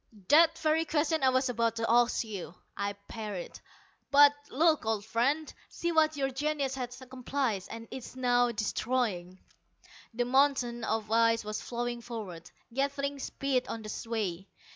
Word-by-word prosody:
"The 325 +2 +8
very 320 0 +1
question 315 +1 +1
I 265 - +5
was 260 +1 +2
about 230 -2 0
to 230 0 -1
ask 240 +1 +3
you," 200 -6 -7 0.2
I 200 0 -2
parried. 210 -5 -6 0.5
"But 285 0 +7 0.2
look, 310 +2 +3
old 220 -2 -1
friend: 275 +8 0 0.2
see 340 - -2
what 315 -2 +3
your 270 -1 0
genius 280 0 -1
has 250 -2 -5
accomplished 255 -5 -2
and 230 0 -8
is 260 -1 -8
now 245 -1 +2
destroying." 210 -4 -1 0.8
The 245 +1 +1
mountain 255 -2 +2
of 220 -1 -2
ice 230 0 +3
was 215 0 -4
flowing 240 0 -3
forward, 205 -9 -7 0.2
gathering 280 +1 -1
speed 265 -1 -1
on 225 - -5
the 215 - -5
way. 195 -5 -2
245 Hz, 150 wpm, -30 LUFS, 225-280 Hz, 0.8 s, The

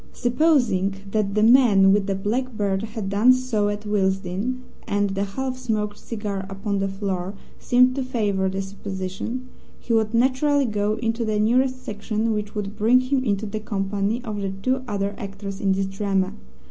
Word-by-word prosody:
Supposing 245 - +2 0.2
that 210 -2 0
the 210 - +3
man 220 -5 +6
with 200 0 +2
the 195 - 0
black 225 +5 -2
beard 195 -2 0
had 215 -2 -5
done 205 +6 +5
so 245 -5 0
at 205 +1 -4
Willesden 195 +4 -1 0.2
(and 205 -2 +1
the 195 +1 -1
half 255 +6 -3
smoked 210 -4 -2
cigar 205 -4 -4
upon 195 +1 -2
the 195 - 0
floor 195 -1 -3 0.2
seemed 250 +1 +4
to 270 0 -2
favour 205 -6 0
the 195 +1 -2
supposition), 195 +5 -5 0.3
he 235 - -2
would 220 0 +2
naturally 270 +4 +3
go 210 -2 0
into 230 +1 -1
the 215 -1 0
nearest 255 +4 +2
section, 215 +2 -1
which 210 0 -4
would 205 -1 -4
bring 230 +4 +4
him 255 +1 0
into 205 -3 0
the 215 +1 -4
company 205 +2 -2
of 210 -4 -4
the 195 - -1
two 255 +8 -1
other 200 -2 -1
actors 195 0 -6
in 195 - +2
this 195 0 0
drama. 195 -1 -1
210 Hz, 175 wpm, -23 LUFS, 195-240 Hz, 0.3 s, man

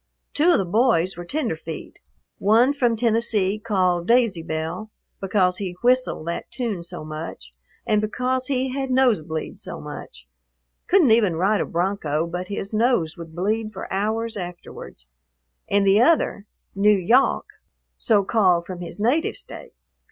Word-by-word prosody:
Two 310 +4 +3
of - - +4
the 195 - 0
boys 195 -2 +2
were 175 - -7
tenderfeet: 170 - -4 0.4
one 230 +7 +4
from 245 -5 +1
Tennessee 220 -3 +1
called 185 -5 0
"Daisy 230 -7 +3
Belle," 160 +6 -4 0.3
because 185 -2 +1
he 180 -3 -5
whistled 255 -9 +2
that 170 0 -4
tune 230 -8 -3
so 170 -2 -9
much 155 - -7 0.3
and 210 -1 +2
because 250 +4 -1
he 265 -1 0
had 270 +1 -3
nose 255 -7 +3
bleed 155 0 -6
so - - -7
much, - - -9 0.6
couldn't 345 - +4
even 215 -6 +4
ride 195 +5 +2
a - - -2
broncho 170 -4 -1
but 175 +2 -5
his 200 +1 -5
nose 215 -8 +1
would 165 -2 -10
bleed 215 +4 -1
for 190 - -7
hours 220 +3 -1
afterwards; 175 - -8 0.6
and 200 0 +2
the 195 +3 +5
other, 250 -8 +2 0.3
"N'Yawk," 210 +5 +3 0.5
so 210 -3 +2
called 185 -5 +2
from 180 0 -7
his 175 +3 -8
native 255 +10 +1
State. - - -8
205 Hz, 150 wpm, -23 LUFS, 175-235 Hz, 0.6 s, the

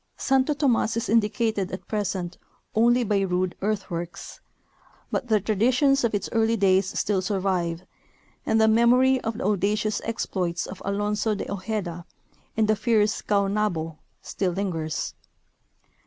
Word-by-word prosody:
Santo 270 +2 +2
Tomas 240 -6 +1
is 230 - -2
indicated 215 -2 +1
at 185 - -7
present 190 -4 -3 0.3
only 240 +3 +4
by 205 -2 +1
rude 185 -1 0
earthworks, 185 -5 -4 0.7
but - - -2
the 215 -2 +3
traditions 250 +7 +2
of 230 -3 +1
its 200 - -2
early 225 0 +2
days 190 -1 +2
still 200 -3 +1
survive, 185 -3 -1 0.6
and 220 - +2
the 220 - +5
memory 250 +4 +4
of 225 0 -3
the 260 - -4
audacious 210 +1 0
exploits 180 -6 -2
of 185 - -9
Alonzo 210 +2 0
de - - -5
Ojeda 190 -4 -4 0.5
and 220 -1 +3
the 215 - +3
fierce 215 -1 +1
Caonabo 200 -6 0 0.2
still 185 -3 -2
lingers. 165 -5 -3
210 Hz, 135 wpm, -25 LUFS, 190-225 Hz, 0.7 s, the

